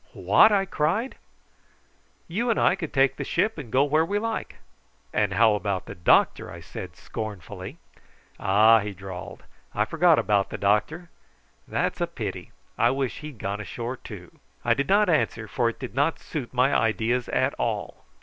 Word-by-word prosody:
"What!" 220 - +5
I 195 -2 +2
cried. 190 - -1 1.1
"You 225 +9 -1
and 230 - +2
I - - +4
could 165 -5 -6
take 135 0 +2
the - - -3
ship 200 +2 0
and 125 -7 -8
go 130 +3 +4
where 155 +2 +2
we 200 +5 -1
like." 225 +1 -3 0.6
"And - - +1
how 110 -1 +5
about 100 -2 -2
the - - -8
doctor?" 85 - +2
I - - -9
said - - -9
scornfully. 105 -6 -7 0.6
"Ah!" 105 +3 +5
he 105 -1 -4
drawled, 95 -1 -9 0.3
"I 105 - +2
forgot 165 +3 +4
about 100 -2 +1
the - - -5
doctor. 150 - 0 0.6
That's - - -2
a - - +1
pity. - - -6 0.3
I - - +5
wish 135 -2 -2
he'd 150 -4 -9
gone 100 0 -4
ashore 120 +4 -5
too." 90 -8 -11 0.3
I 120 - +4
did 140 +4 -2
not 205 +2 +4
answer, 145 -9 0
for 120 +2 0
it 115 - -9
did 130 - -6
not 145 +5 +1
suit 140 -7 -6
my 130 +2 +2
ideas 115 +2 +1
at - - +1
all. - - -3
125 Hz, 175 wpm, -25 LUFS, 105-165 Hz, 1.1 s, What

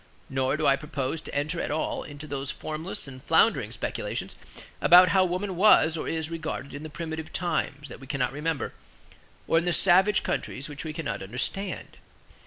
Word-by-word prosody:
Nor 135 +2 +1
do 155 - -1
I 135 - +6
propose 140 +1 -3
to - - -9
enter 155 +4 -1
at - - -2
all 155 +2 -1
into 145 0 -9
those 140 -2 -4
formless 155 +3 -4
and 130 -1 -10
floundering - - +3
speculations - - -4 0.5
about 180 +1 +8
how 190 -1 +5
woman 185 +2 -2
was 170 -4 +6
or 160 - -3
is 160 0 -2
regarded 155 -4 -4
in 145 - -6
the 155 - -7
primitive 160 +1 -5
times 150 -4 -2
that - - -10
we 135 - -12
cannot 130 -2 -1
remember, 150 -2 -2 0.7
or 165 - +4
in 170 - -4
the 175 - +1
savage 190 +5 +4
countries 135 - -3
which 145 -1 -6
we 160 - -4
cannot 160 - -4
understand. 125 - -4
155 Hz, 185 wpm, -27 LUFS, 140-170 Hz, 0.7 s, about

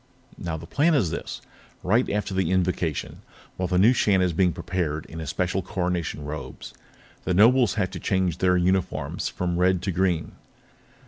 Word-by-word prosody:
"Now, 85 -2 -3
the 80 - -9
plan 155 - +2
is 95 - +1
this: - - -5 0.4
Right 115 +7 +2
after 100 -1 -2
the 95 -3 0
Invocation, 90 -4 -1 0.3
while 90 - -2
the 90 - 0
new 110 +7 +6
Shan 100 -5 +3
is 90 -2 +1
being 90 +1 +3
prepared 85 -3 -3
in 80 - -9
his 80 -3 -5
special 90 +3 -1
Coronation 90 -5 -3
Robes, 75 +1 -7 0.5
the 90 - 0
Nobles 115 +2 +5
have 95 -4 -1
to 95 - -6
change 95 -3 0
their 90 -1 +3
uniforms 90 +1 0
from 90 -1 -2
red 90 0 +2
to 100 - -1
green. 90 -2 0
90 Hz, 175 wpm, -25 LUFS, 85-95 Hz, 0.5 s, new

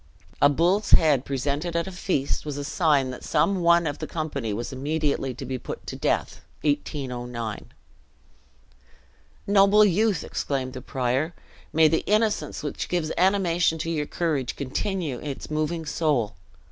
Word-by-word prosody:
A 145 - +7
bull's 175 +8 +2
head, 145 -5 +5
presented 145 +5 -2
at 170 - +1
a 190 - -6
feast, 180 -6 -1
was 150 -2 -5
a 145 - -3
sign 140 -4 +2
that 125 - -9
some 195 -2 +1
one 170 0 +5
of 145 -2 -3
the - - -4
company 145 -8 -3
was 115 +5 -4
immediately 140 -1 -1
to 135 - -7
be 130 0 -4
put - - -7
to - - -5
death. - - -1 0.2
(1809.) 125 -6 -3 1.7
"Noble 200 +1 +6
youth!" 205 -2 +2
exclaimed 130 -2 -3
the 130 - -7
prior, 130 +6 -1 0.4
"may 160 0 +5
the 160 +1 +1
innocence 210 -9 +1
which 145 - -4
gives 165 -3 -1
animation 175 -3 +2
to 165 +1 -3
your 150 -3 -1
courage, 150 -8 -1
continue 150 - -2
its 145 0 -6
moving 155 +2 -1
soul! 145 -9 0
150 Hz, 150 wpm, -25 LUFS, 135-170 Hz, 1.7 s, A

